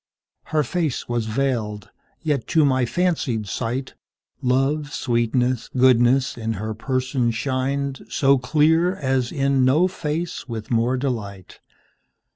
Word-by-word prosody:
Her 155 -1 +1
face 160 -4 -2
was 120 -2 -1
veiled; 110 -4 -2 0.3
yet 145 -6 -1
to 160 -3 +3
my 130 -2 +2
fancied 155 -10 0
sightLove, 130 +5 -3
sweetness, 120 -2 0
goodness, 125 0 +4
in 115 0 -2
her 110 +1 -4
person 130 +1 -1
shinedSo 135 +2 0
clear 160 +7 +3
as 130 -3 -1
in 135 -1 +1
no 150 +8 +4
face 165 -4 -4
with 110 -1 -6
more 120 +2 +2
delight. 105 -8 -5
130 Hz, 110 wpm, -22 LUFS, 120-140 Hz, 0.3 s, goodness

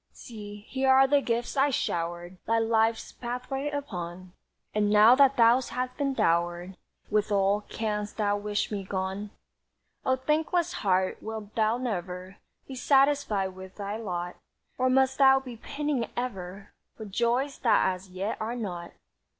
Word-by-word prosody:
"See, 210 -2 -10
here 265 0 0
are 265 +1 +7
the 285 +1 +3
gifts 235 0 -2
I 280 +1 +3
showered 175 -5 -3
Thy 230 +1 +3
life's 225 0 +1
pathway 255 +4 -4
upon, 185 -10 -6 0.4
And 210 -1 +2
now 210 +3 +7
that 275 0 +5
thou 235 +2 +6
hast 255 0 -4
been 275 -1 -1
dowered 175 +1 0 0.4
With 210 0 +1
all, 200 +1 +2
canst 210 -1 -3
thou 205 -2 +1
wish 210 +1 -2
me 200 -2 -3
gone? 190 +2 -3 0.7
"O 260 - +2
thankless 315 +5 0
heart, 185 -1 +1
wilt 220 -1 -7
thou 220 +1 +2
never 185 -5 -4 0.3
Be 270 - -8
satisfied 270 -6 +2
with 190 0 -11
thy 200 0 -4
lot, 180 -5 -4 0.4
Or 255 0 +1
must 265 +1 +2
thou 270 -1 +7
be 250 -3 -9
pining 285 0 -2
ever 195 -5 -5 0.2
For 220 - -7
joys 240 +7 0
that 215 -5 +3
as 185 +1 -11
yet 190 +5 -4
are 225 +2 -2
not? 180 -7 -5
220 Hz, 150 wpm, -28 LUFS, 190-260 Hz, 0.7 s, are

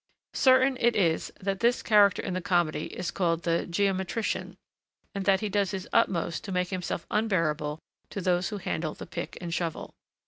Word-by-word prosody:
Certain 260 0 +4
it 235 0 +3
is 165 -5 +1
that 195 0 -2
this 240 +1 +2
character 205 -3 +4
in 190 - -3
the 185 - -2
comedy 170 -4 +1
is 180 -3 -4
called 170 -3 0
the 170 0 0
geometrician, 190 +3 -1 0.6
and 200 -2 -3
that 195 -1 +3
he 215 - -1
does 200 -1 +1
his 190 -2 -5
utmost 170 -2 +1
to 200 - -6
make 180 -1 0
himself 180 -3 -3
unbearable 165 -8 0 0.3
to - - -5
those 180 -1 +1
who 210 - -4
handle 160 -4 -3
the - - -8
pick - - -6
and 170 -1 -5
shovel. 165 -2 -3
185 Hz, 180 wpm, -28 LUFS, 170-205 Hz, 0.6 s, Certain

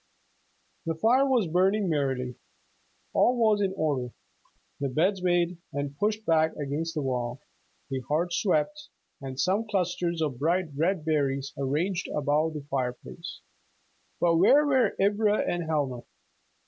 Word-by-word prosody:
The 165 - 0
fire 245 - +3
was 250 -6 +3
burning 190 +5 +2
merrily. 135 -5 -1 0.8
All 250 +1 +3
was 215 -3 +3
in 195 -2 +1
order, 135 -7 -1 0.7
the 140 -1 -1
beds 180 +8 +1
made 175 -1 +1
and 145 0 -3
pushed 210 +6 -1
back 160 -1 +2
against 150 +4 -3
the 150 - -1
wall, 125 -1 -2 0.5
the 135 - -1
hearth 170 +4 0
swept, 210 - 0 0.3
and 135 -1 -6
some 200 +7 +1
clusters 175 -3 -1
of 145 -6 -2
bright 170 +3 +1
red 165 +2 0
berries 140 -3 0
arranged 160 +7 -1
above 150 +2 +1
the 145 -2 -6
fireplace. 125 - -4 0.8
But 170 -1 +3
where 275 - +6
were 265 -3 +2
Ivra 205 +1 +3
and 175 -1 -1
Helma? 145 -6 -1
165 Hz, 135 wpm, -27 LUFS, 140-195 Hz, 0.8 s, where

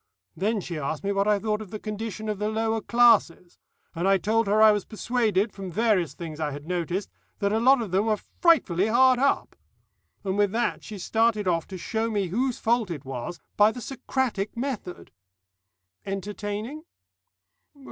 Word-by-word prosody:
Then 210 +2 0
she 170 -3 -5
asked 150 +4 -3
me 200 - 0
what 200 0 +1
I 210 -1 +4
thought 210 +1 -2
of 210 - -9
the 215 - -5
condition 215 0 -5
of 210 -2 -2
the 210 0 0
lower 225 0 -1
classes, 235 -8 +3 0.3
and 170 +3 -1
I 195 0 +5
told 220 +3 +1
her 210 +2 +3
I 220 0 +8
was 205 -2 0
persuaded, 220 -3 0
from 195 -2 -7
various 200 -3 +1
things 160 -3 -7
I 155 -2 -1
had 145 +1 -8
noticed, 180 +2 -2 0.3
that 200 -1 0
a 220 - +2
lot 255 +1 +5
of 205 - -7
them 195 +4 +1
were 215 -1 +2
frightfully 215 - +2
hard 255 +2 +5
up. 280 +1 +1 0.7
And 195 0 -2
with 205 -2 +3
that 235 +1 -1
she 215 - -8
started 215 +2 +1
off 165 -2 0
to 190 - -7
show 220 +5 -2
whose 220 +5 -1
fault 230 -3 +1
it 150 -5 -6
was, 130 +5 -6 0.2
by 210 +1 +5
the 245 - -8
Socratic 245 -5 -3
method." 235 -8 -5 0.9
"Entertaining?" 205 +7 -5
210 Hz, 175 wpm, -26 LUFS, 190-225 Hz, 0.9 s, I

